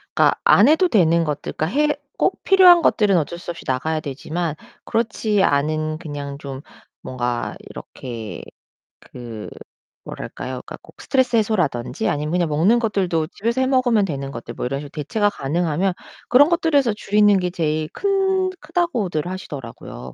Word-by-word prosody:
그러니까 - - +3
안 210 - +6
해도 320 +4 +4
되는 170 - +3
것들, 150 -1 -3
그러니까 155 - -1
해 300 0 +2 0.2
꼭 - - 0
필요한 365 -3 +7
것들은 205 - +3
어쩔 170 +2 -2
수 175 - -6
없이 170 - -11
나가야 155 +5 -1
되지만 155 +3 -4 0.3
그렇지 220 -3 0
않은 155 +1 0
그냥 145 -3 -6
좀 135 -2 -7 0.4
뭔가 120 -2 -3
이렇게 115 -4 -8 0.6
그 115 -4 -9 0.6
뭐랄까요? - - -7
그러니까 - - -9
꼭 - - -16
스트레스 260 -3 +1
해소라든지 180 - 0
아니면 150 +1 -1
그냥 175 -1 +1
먹는 170 +10 +3
것들도 190 -8 0
집에서 235 +5 -1
해 - - +3
먹으면 250 -6 +3
되는 140 -6 -4
것들 120 -2 -8
뭐 125 - -3
이런 135 +2 -3
식으로 145 0 -8
대체가 205 +7 0
가능하면 170 +4 -1 0.4
그런 285 +5 +6
것들에서 305 - +2
줄이는 205 -1 +3
게 180 -1 -1
제일 155 -3 -1
큰 385 -1 +1
크다고들 245 - -1
하시더라고요, 120 - -8
175 Hz, 365 characters per minute, -21 LUFS, 145-230 Hz, 0.6 s, 필요한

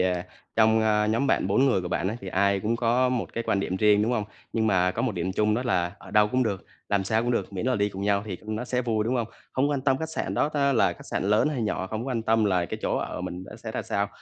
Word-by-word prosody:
ờ, 90 -1 +1 0.3
trong, 110 0 +5
ơ, 105 -1 +2
nhóm 115 +6 +1
bạn 135 - +2
4 105 +8 +3
người 120 -8 +3
của 90 - -5
bạn 85 +2 -1
á 110 - -3
thì 95 - -7
ai 100 +1 +2
cũng 115 +3 0
có 120 +2 +2
một 125 -2 -2
cái 115 - -3
quan 100 - +1
điểm 95 -1 -2
riêng, 105 +1 +4
đúng 115 +3 +1
hông? 110 -4 0 0.3
Nhưng 110 -1 +1
mà 90 -3 +3
có - - -3
một 125 -4 0
điểm 90 +1 -2
chung 105 +2 +2
đó 125 - -1
là, 90 -7 0
ở - - -13
đâu 105 0 +4
cũng 130 +3 +1
được, 100 -5 -2 0.2
làm 100 -1 +1
sao 110 +3 +1
cũng 120 - 0
được, 115 - -1
miễn 95 +5 -3
là 130 - +2
đi 100 0 +1
cùng 95 -1 -7
nhau 100 0 +2
thì, 95 -4 -4
ừm, 110 0 -4
nó 120 - -3
sẽ 125 0 -1
vui, 110 -3 0
đúng 125 - 0
hông? 120 -3 0 0.3
Không 140 +3 +1
quan 140 -2 0
tâm 135 -1 +2
khách 160 - -3
sạn - - -3
đó 145 - +2
ta 140 -2 +1
là 120 - +3
khách - - -13
sạn - - -1
lớn 105 +8 +3
hay 130 -6 -2
nhỏ, 100 -3 -1
không 110 +3 -4
có - - -4
quan 115 -4 -1
tâm 110 0 +2
là 90 -4 +2
cái - - -5
chỗ - - 0
ở - - -4
mình 90 +1 -5
đó - - -11
sẽ 115 -1 -7
ra - - -2
sao, 100 0 -1
110 Hz, 315 wpm, -26 LUFS, 100-120 Hz, 0.3 s, trong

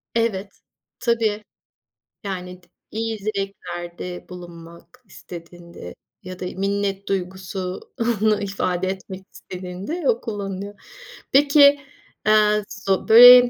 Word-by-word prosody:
Evet, 210 -4 -1 0.4
tabii. 225 -3 +1 0.8
Yani 180 -2 -5
t 175 - -26 0.2
iyi 225 0 -2
dileklerde 180 -4 -5
bulunmak 175 +6 -12
istediğinde 170 - -10 0.3
ya 185 0 -8
da - - -4
minnet 195 +1 -1
duygusunu 195 +4 -1
ifade 190 -2 -1
etmek 190 0 -5
istediğinde 185 - -6
o 470 - +2
kullanılıyor. 200 -2 -4 0.6
Peki, 285 +1 +7 0.5
eee, 210 0 +5
zo 195 -1 -1
böy 245 +2 +11
195 Hz, 95 wpm, -23 LUFS, 180-215 Hz, 0.8 s, böy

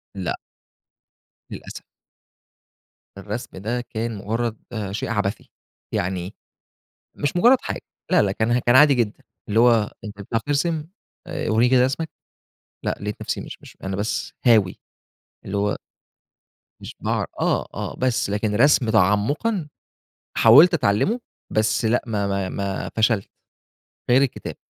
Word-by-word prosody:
لأ. 95 -3 -2 1.2
للأسف. - - -8 1.3
الرسم 105 +3 -6
ده 115 +6 -2
كان 115 -1 -4
مجرّد، 115 +3 -2 0.3
شيء 100 - -3
عبثي. 105 -2 -2 0.4
يعني 90 +1 -2 0.8
مش 145 +4 -2
مجرّد 245 +8 +6
حاجة. - - -4 0.3
لأ، - - +5
لأ، 100 -2 +1
كان، 115 +4 +1
كان 120 +1 +3
عادي 145 +1 +7
جدًا. 115 -4 -1 0.3
اللي 110 +2 +3
هو 115 -4 +4
أنت 105 -1 -8
بتعرف 115 +3 -2
ترسم 150 +3 -1 0.4
آآ، 175 - -3
ورّيني 115 +3 +4
كده 125 -1 +5
رسمك. 150 +5 -1 0.8
لأ، - - -1
لقيت 105 0 -5
نفسي، - - -3
مش - - -9
مش - - -15
أنا 95 0 -3
بس 105 +3 -3
هاوي، 110 -7 +4 0.7
اللي 100 +1 -3
هو 105 +1 0 1.0
مش - - -9
باعر - - -1
آه، - - +1
آه، - - -5
بس 125 -5 0
لكن 105 +1 -1
رسم 130 0 +4
تعمقًا 110 - +2 0.7
حاولت 150 +11 +8
أتعلمه، 160 - +1 0.3
بس 110 +1 +1
لأ، 115 +2 +2
ما 105 -3 -1
ما 100 -1 -1
ما 100 0 -3
فشلت. 110 -2 +2 0.8
غير 125 +2 +6
الكتابة. 135 -3 -3
110 Hz, 135 wpm, -23 LUFS, 100-130 Hz, 1.3 s, حاولت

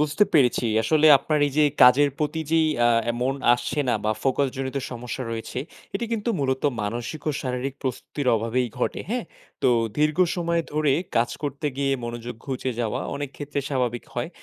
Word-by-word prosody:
বুঝতে 150 +7 +3
পেরেছি। 125 -5 +4 0.2
আসলে 155 +4 +3
আপনার 150 +2 0
এই 145 - -4
যে 150 - +6 0.2
কাজের 125 +4 +7
প্রতি 155 +1 -1
যেই 160 -1 +4 0.2
আ - - +5 0.3
মন 130 +2 +1 0.2
আসছে 125 +4 -2
না - - +3
বা 110 - +2
focus 135 +1 +2
জনিত 135 0 -3
সমস্যা 125 +1 -5
রয়েছে 115 +2 -5 0.4
এটি 215 +4 -1
কিন্তু 230 +1 -1
মূলত 130 -1 0 0.2
মানসিক 120 +8 -4
ও - - +3
শারীরিক 130 +1 -3
প্রস্তুতির 130 +1 -3
অভাবেই 115 +3 0
ঘটে। - - -1
হ্যাঁ? - - -1 0.4
তো - - +5 0.3
দীর্ঘ 150 +2 +2 0.2
সময় 170 -1 0
ধরে 150 -2 +2 0.2
কাজ 115 +1 +2
করতে 145 +1 -3
গিয়ে 140 0 +1
মনোযোগ 120 +1 -5
ঘুচে 130 -1 -2
যাওয়া 110 -3 -1 0.2
অনেক 145 -2 -4
ক্ষেত্রে 145 -1 -3
স্বাভাবিক 125 -3 -1
হয় 120 +5 -2
135 Hz, 175 wpm, -24 LUFS, 125-150 Hz, 0.4 s, কাজের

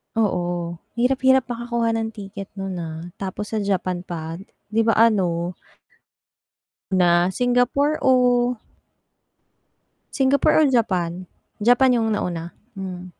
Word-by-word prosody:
Oo. 175 -5 -1 0.2
Hirap 250 +2 +1
hirap 265 -1 +5
makakuha 235 -1 -1
ng 225 -1 -2
ticket 200 -1 -8
nun, 195 -2 -4
ha, 165 +1 -7
tapos 195 +1 -5
sa 220 - -1
Japan 185 -3 -1
pa, 165 0 -6 0.3
'di 225 +1 +2
ba? 225 - +4
Ano 180 -6 +2 1.4
Na 175 -2 +4
Singapore 245 +6 +1
o? 245 -1 +3 1.6
Singapore 280 +3 +3
or - - +5
Japan? 185 -7 0 0.3
Japan 245 +3 +4
yung 225 -1 0
nauna? 170 -3 -3 0.2
Mm. 185 -1 -6
205 Hz, 115 wpm, -22 LUFS, 175-245 Hz, 1.6 s, hirap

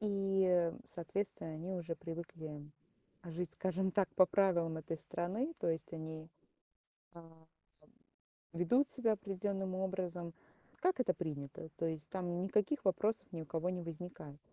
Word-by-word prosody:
И, 195 -4 +3 0.2
соответственно, 175 0 -2
они 170 +4 -4
уже 170 -2 -2
привыкли 165 -3 -6 0.6
жить, 175 -1 -3
скажем 190 +1 +1
так, 195 -1 +3
по 185 - +9
правилам 175 -5 +3
этой 160 +1 -3
страны. 225 - -1
То - - +2
есть 160 +1 -1
они, 160 -1 -5 0.9
ам, 165 -1 -14 1.1
ведут 245 - +4
себя 230 -4 +2
определенным 195 -2 -1
образом, 180 -3 -2 0.5
как 365 -4 +3
это 215 -8 +4
принято. 145 -4 -4
То 165 - 0
есть 160 -2 -2
там 180 -2 -1
никаких 210 +9 +2
вопросов 210 +4 +3
ни 165 -3 -4
у - - -6
кого 165 +4 0
не 180 -1 -2
возникает. 165 -3 -7
180 Hz, 135 wpm, -37 LUFS, 165-195 Hz, 1.1 s, по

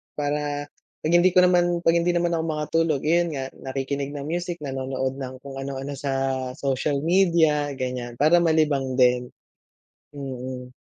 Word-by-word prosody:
para 145 0 -2 0.4
'pag 155 - 0
hindi 175 +1 +4
ko 180 - +7
naman 175 -1 +3
'pag 165 - +5
hindi 175 +1 +1
naman 170 0 +1
ako 165 -1 0
makatulog, 155 -1 0
yun 170 0 +2
nga 135 0 -4
nakikinig 140 +1 -4
ng 140 - -5
music, 170 +1 -4
nanonood 130 0 -3
ng 130 -1 -5
kung 135 -1 -7
ano-ano 135 +1 -5
sa 140 -2 -2 0.4
social 140 0 -1
media, 165 -4 +3
ganyan. 125 -2 -4
Para 155 +7 +4
malibang 150 -5 +2
din. 125 -1 +3 0.8
Mm. 130 -2 -7
145 Hz, 150 wpm, -24 LUFS, 135-165 Hz, 0.8 s, ko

